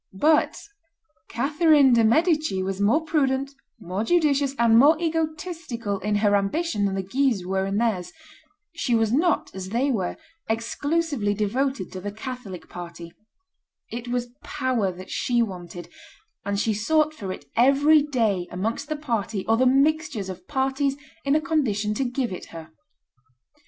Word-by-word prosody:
But 310 Hz, +4 st, +3 dB, 0.7 s
Catherine 290 Hz, +1 st, +4 dB
de' 230 Hz, -1 st, +4 dB
Medici 305 Hz, -, +2 dB
was 195 Hz, +1 st, -3 dB
more 245 Hz, +11 st, +2 dB
prudent, 275 Hz, -3 st, 0 dB, 0.3 s
more 190 Hz, +1 st, -3 dB
judicious, 285 Hz, -2 st, +2 dB
and 235 Hz, -1 st, +4 dB
more 300 Hz, +5 st, +6 dB
egotistical 315 Hz, -, -3 dB
in 210 Hz, +2 st, -1 dB
her 205 Hz, 0 st, +3 dB
ambition 205 Hz, +3 st, 0 dB
than 195 Hz, -1 st, -1 dB
the 195 Hz, -, -2 dB
Guises 235 Hz, -2 st, 0 dB
were 190 Hz, +1 st, -1 dB
in 195 Hz, +1 st, -1 dB
theirs; 215 Hz, -6 st, 0 dB, 0.6 s
she 265 Hz, -8 st, 0 dB
was 225 Hz, -1 st, +2 dB
not, 320 Hz, +6 st, +1 dB
as 190 Hz, 0 st, -6 dB
they 250 Hz, +6 st, +1 dB
were, 190 Hz, -7 st, -2 dB, 0.3 s
exclusively 240 Hz, 0 st, -1 dB
devoted 215 Hz, 0 st, -1 dB
to 185 Hz, -, -7 dB
the 205 Hz, +2 st, -4 dB
Catholic 220 Hz, -5 st, -7 dB
party; 170 Hz, -1 st, -9 dB, 0.8 s
it 240 Hz, +1 st, -6 dB
was 245 Hz, 0 st, -2 dB
power 240 Hz, -7 st, -1 dB
that 185 Hz, +1 st, -11 dB
she 240 Hz, -1 st, +1 dB
wanted, 175 Hz, -4 st, -7 dB, 0.6 s
and 200 Hz, 0 st, -2 dB
she 220 Hz, +1 st, +1 dB
sought 305 Hz, +9 st, +1 dB
for 195 Hz, -11 st, -6 dB
it -, -, -8 dB
every 280 Hz, +5 st, +5 dB
day 225 Hz, -11 st, 0 dB
amongst 225 Hz, -, -3 dB
the 310 Hz, -, -1 dB
party 230 Hz, -9 st, -3 dB
or 225 Hz, -, +3 dB
the 255 Hz, +3 st, +3 dB
mixtures 275 Hz, -5 st, +1 dB
of 185 Hz, -, -9 dB
parties 270 Hz, 0 st, 0 dB, 0.3 s
in 280 Hz, +1 st, +2 dB
a -, -, +4 dB
condition 235 Hz, -11 st, 0 dB
to 240 Hz, -, -1 dB
give 250 Hz, -1 st, -2 dB
it -, -, -7 dB
her. 160 Hz, -1 st, -11 dB
235 Hz, 155 wpm, -24 LUFS, 200-285 Hz, 0.8 s, more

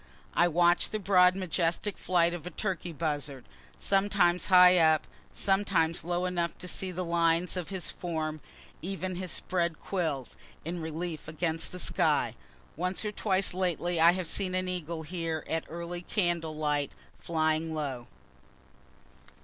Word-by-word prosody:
I 175 Hz, -, +4 dB
watch 175 Hz, +1 st, +3 dB
the 215 Hz, -, -2 dB
broad 185 Hz, -2 st, +5 dB
majestic 185 Hz, +2 st, -1 dB
flight 170 Hz, -1 st, +2 dB
of 175 Hz, -1 st, -6 dB
a -, -, -3 dB
turkey 180 Hz, -3 st, -3 dB
buzzard, 145 Hz, -4 st, -3 dB, 0.3 s
sometimes 195 Hz, -3 st, +2 dB
high 180 Hz, -1 st, +8 dB
up, 160 Hz, -2 st, +4 dB, 0.3 s
sometimes 195 Hz, -4 st, +1 dB
low 175 Hz, +1 st, -1 dB
enough 175 Hz, -2 st, -1 dB
to 180 Hz, -, -8 dB
see 185 Hz, +1 st, -2 dB
the 180 Hz, 0 st, -3 dB
lines 170 Hz, +1 st, +2 dB
of 180 Hz, -2 st, -4 dB
his 190 Hz, -3 st, -2 dB
form, 155 Hz, -3 st, -4 dB, 0.4 s
even 185 Hz, 0 st, -4 dB
his 185 Hz, -1 st, -3 dB
spread 170 Hz, -3 st, -1 dB
quills, 160 Hz, -9 st, -3 dB, 0.3 s
in 170 Hz, +1 st, -3 dB
relief 160 Hz, 0 st, -5 dB
against 160 Hz, +1 st, -2 dB
the 180 Hz, -, -7 dB
sky. -, -, +1 dB, 0.4 s
Once 180 Hz, +6 st, -1 dB
or 210 Hz, -, -1 dB
twice 195 Hz, -3 st, +1 dB
lately 175 Hz, -2 st, 0 dB
I 170 Hz, +1 st, +7 dB
have 185 Hz, -1 st, -2 dB
seen 185 Hz, +2 st, -1 dB
an 185 Hz, 0 st, -1 dB
eagle 170 Hz, -3 st, -4 dB
here 165 Hz, -1 st, -3 dB
at 160 Hz, 0 st, -2 dB
early 170 Hz, +1 st, -5 dB
candle 175 Hz, -4 st, -1 dB
light 150 Hz, -2 st, -1 dB, 0.3 s
flying 160 Hz, 0 st, 0 dB
low. 135 Hz, -6 st, -4 dB
175 Hz, 150 wpm, -29 LUFS, 160-185 Hz, 0.4 s, high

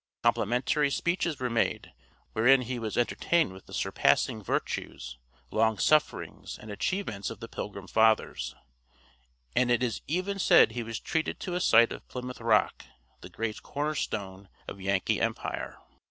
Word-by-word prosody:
Complimentary 130 Hz, +6 st, +2 dB
speeches 170 Hz, 0 st, -1 dB
were 125 Hz, -, -1 dB
made 115 Hz, -2 st, 0 dB
him, -, -, -20 dB, 0.4 s
wherein 125 Hz, +4 st, +5 dB
he 125 Hz, 0 st, -4 dB
was 110 Hz, -2 st, -4 dB
entertained 120 Hz, -, +1 dB
with 95 Hz, -, -14 dB
the -, -, -12 dB
surpassing 110 Hz, -, +2 dB
virtues, 60 Hz, -9 st, -3 dB, 0.3 s
long 110 Hz, 0 st, +2 dB
sufferings, 155 Hz, +8 st, +1 dB
and 105 Hz, -, -10 dB
achievements 105 Hz, -, -2 dB
of 115 Hz, -, -8 dB
the 115 Hz, -, -7 dB
Pilgrim 100 Hz, -3 st, -6 dB
Fathers; 100 Hz, -, +2 dB, 1.0 s
and 125 Hz, -, +3 dB
it 120 Hz, 0 st, +2 dB
is 120 Hz, -3 st, -1 dB
even 185 Hz, +6 st, -1 dB
said 145 Hz, -, +6 dB
he 120 Hz, +2 st, -3 dB
was 115 Hz, 0 st, -5 dB
treated 160 Hz, 0 st, -2 dB
to 180 Hz, -, -4 dB
a 180 Hz, -, -1 dB
sight 115 Hz, -4 st, +6 dB
of -, -, -8 dB
Plymouth 125 Hz, 0 st, -7 dB
Rock, -, -, +2 dB, 0.4 s
that -, -, -12 dB
great 110 Hz, -1 st, -3 dB
corner 150 Hz, +2 st, -2 dB
stone 100 Hz, -7 st, -4 dB, 0.2 s
of 100 Hz, -, -8 dB
Yankee 95 Hz, 0 st, 0 dB
empire. -, -, -3 dB
115 Hz, 155 wpm, -29 LUFS, 105-140 Hz, 1.0 s, said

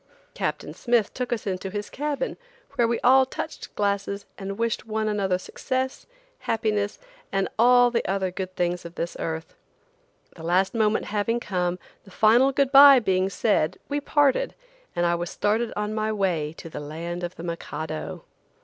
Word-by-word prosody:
Captain -, -, -3 dB
Smith 235 Hz, -4 st, +1 dB
took 250 Hz, -1 st, -4 dB
us 240 Hz, -, -2 dB
into 190 Hz, -1 st, -3 dB
his 205 Hz, +1 st, -4 dB
cabin, 295 Hz, -, -2 dB, 0.4 s
where 240 Hz, -4 st, +2 dB
we 235 Hz, 0 st, 0 dB
all 265 Hz, +2 st, +6 dB
touched 260 Hz, -, -6 dB
glasses 200 Hz, 0 st, -1 dB
and 195 Hz, 0 st, -6 dB
wished 230 Hz, -1 st, -1 dB
one 215 Hz, 0 st, -1 dB
another 195 Hz, -3 st, +1 dB
success, 260 Hz, +7 st, -3 dB, 0.3 s
happiness 210 Hz, -2 st, -1 dB, 0.3 s
and 195 Hz, -1 st, +1 dB
the 245 Hz, 0 st, +5 dB
other 190 Hz, -1 st, 0 dB
good 185 Hz, 0 st, -5 dB
things 175 Hz, 0 st, -1 dB
of 170 Hz, 0 st, -10 dB
this 170 Hz, -1 st, -3 dB
earth. 160 Hz, 0 st, -4 dB, 0.8 s
The 165 Hz, -, -12 dB
last 180 Hz, +3 st, +2 dB
moment 220 Hz, -2 st, +1 dB
having 220 Hz, +3 st, +1 dB
come, 180 Hz, -5 st, -1 dB, 0.3 s
the 200 Hz, -, -16 dB
final 230 Hz, +7 st, +4 dB
good 275 Hz, 0 st, +1 dB
bye 275 Hz, 0 st, +10 dB
being 190 Hz, -5 st, +1 dB
said, 195 Hz, -6 st, +1 dB
we 290 Hz, 0 st, -1 dB
parted, 290 Hz, -, +2 dB, 0.4 s
and 175 Hz, 0 st, +1 dB
I 170 Hz, -, +3 dB
was 170 Hz, 0 st, -2 dB
started 220 Hz, +3 st, 0 dB
on 210 Hz, 0 st, -2 dB
my 215 Hz, 0 st, -1 dB
way 175 Hz, -7 st, 0 dB
to -, -, -9 dB
the 160 Hz, -, -7 dB
land 165 Hz, +4 st, -5 dB
of 175 Hz, +1 st, -4 dB
the 165 Hz, -, -9 dB
Mikado. 160 Hz, -2 st, -5 dB
205 Hz, 165 wpm, -25 LUFS, 180-235 Hz, 0.8 s, bye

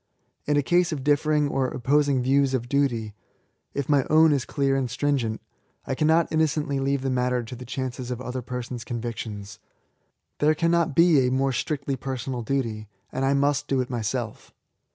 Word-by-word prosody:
In 145 Hz, 0 st, +2 dB
a 145 Hz, -, +2 dB
case 175 Hz, +3 st, +2 dB
of 145 Hz, -4 st, -3 dB
differing 150 Hz, +1 st, +2 dB
or 135 Hz, -2 st, 0 dB
opposing 135 Hz, +1 st, +1 dB
views 135 Hz, +1 st, +3 dB
of 120 Hz, -2 st, -3 dB
duty, 120 Hz, -6 st, 0 dB, 0.3 s
— -, -, -46 dB
^if 140 Hz, -2 st, -2 dB
my 145 Hz, -3 st, +3 dB
own 160 Hz, +1 st, +6 dB
is 135 Hz, -3 st, 0 dB
clear 140 Hz, -1 st, 0 dB
and 135 Hz, -2 st, -1 dB
stringent, 125 Hz, -4 st, -1 dB, 0.5 s
I -, -, -2 dB
cannot 160 Hz, +4 st, +2 dB
innocently 150 Hz, -3 st, +1 dB
leave 135 Hz, 0 st, 0 dB
the 135 Hz, -, 0 dB
matter 125 Hz, -1 st, 0 dB
to 115 Hz, +2 st, -8 dB
the 125 Hz, +1 st, -9 dB
chance 130 Hz, 0 st, -4 dB
of 125 Hz, -1 st, -3 dB
other 130 Hz, 0 st, -4 dB
persons' 125 Hz, -1 st, -5 dB
convictions. 110 Hz, -4 st, -6 dB, 0.8 s
There 155 Hz, +1 st, +3 dB
cannot 170 Hz, -2 st, +1 dB
be 165 Hz, -6 st, +5 dB
a -, -, 0 dB
more 135 Hz, +1 st, +1 dB
strictly 140 Hz, +2 st, -2 dB
personal 130 Hz, -1 st, -4 dB
duty, 115 Hz, -4 st, -2 dB, 0.2 s
and 130 Hz, -, -2 dB
I 135 Hz, +1 st, +3 dB
must 140 Hz, 0 st, +1 dB
do 135 Hz, -, +1 dB
it 125 Hz, 0 st, -2 dB
myself. 110 Hz, -5 st, -3 dB
135 Hz, 180 wpm, -25 LUFS, 125-145 Hz, 0.8 s, own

